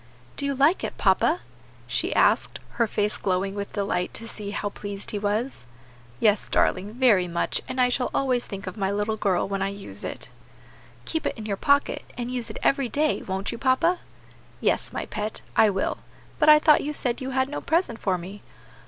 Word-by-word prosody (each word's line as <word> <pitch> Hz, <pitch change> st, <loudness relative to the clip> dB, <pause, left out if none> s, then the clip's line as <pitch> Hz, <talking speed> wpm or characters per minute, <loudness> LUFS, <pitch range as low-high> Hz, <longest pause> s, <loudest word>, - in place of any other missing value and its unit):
"Do 280 Hz, -, -1 dB
you 280 Hz, -, -1 dB
like 285 Hz, +7 st, +3 dB
it, -, -, -4 dB
papa?" 335 Hz, +3 st, +3 dB, 0.4 s
she -, -, 0 dB
asked, -, -, +3 dB, 0.2 s
her 230 Hz, -, +4 dB
face 210 Hz, 0 st, 0 dB
glowing 190 Hz, +1 st, 0 dB
with 200 Hz, 0 st, -5 dB
delight 195 Hz, -3 st, -1 dB
to 230 Hz, -, -6 dB
see 210 Hz, -2 st, -6 dB
how 205 Hz, 0 st, -2 dB
pleased 200 Hz, 0 st, -6 dB
he 205 Hz, -, -2 dB
was. 210 Hz, -, -2 dB, 0.5 s
"Yes, 210 Hz, -2 st, +2 dB
darling, 200 Hz, +3 st, +1 dB
very 225 Hz, -8 st, +4 dB
much; 170 Hz, 0 st, -1 dB
and 255 Hz, -, -4 dB
I 250 Hz, 0 st, +5 dB
shall 250 Hz, 0 st, 0 dB
always 255 Hz, -3 st, 0 dB
think 195 Hz, -1 st, -6 dB
of 185 Hz, -, -6 dB
my 195 Hz, -2 st, 0 dB
little 205 Hz, +2 st, 0 dB
girl 195 Hz, -4 st, +1 dB
when 195 Hz, 0 st, -2 dB
I 195 Hz, -, +1 dB
use 200 Hz, 0 st, -5 dB
it." -, -, -6 dB, 0.8 s
"Keep 320 Hz, -, -1 dB
it -, -, -3 dB
in 215 Hz, -, -7 dB
your 205 Hz, -2 st, -1 dB
pocket, 285 Hz, +7 st, +2 dB
and 245 Hz, 0 st, -3 dB
use 245 Hz, -3 st, -3 dB
it 215 Hz, -, -6 dB
every 275 Hz, -3 st, +2 dB
day, 300 Hz, +3 st, +1 dB
won't 190 Hz, +1 st, -3 dB
you, 235 Hz, -, -6 dB
papa?" 330 Hz, +7 st, +2 dB, 0.6 s
"Yes, -, -, 0 dB
my -, -, -4 dB
pet, 215 Hz, 0 st, -4 dB
I 220 Hz, -, +6 dB
will; 195 Hz, -1 st, -1 dB, 0.4 s
but -, -, +5 dB
I 305 Hz, -, +10 dB
thought 300 Hz, 0 st, +5 dB
you 300 Hz, -, -3 dB
said 245 Hz, -4 st, -2 dB
you 260 Hz, -, -3 dB
had 260 Hz, 0 st, +1 dB
no 295 Hz, -, -5 dB
present 320 Hz, -9 st, 0 dB
for 190 Hz, -2 st, 0 dB
me?" 190 Hz, +4 st, -9 dB
215 Hz, 205 wpm, -25 LUFS, 200-260 Hz, 0.8 s, I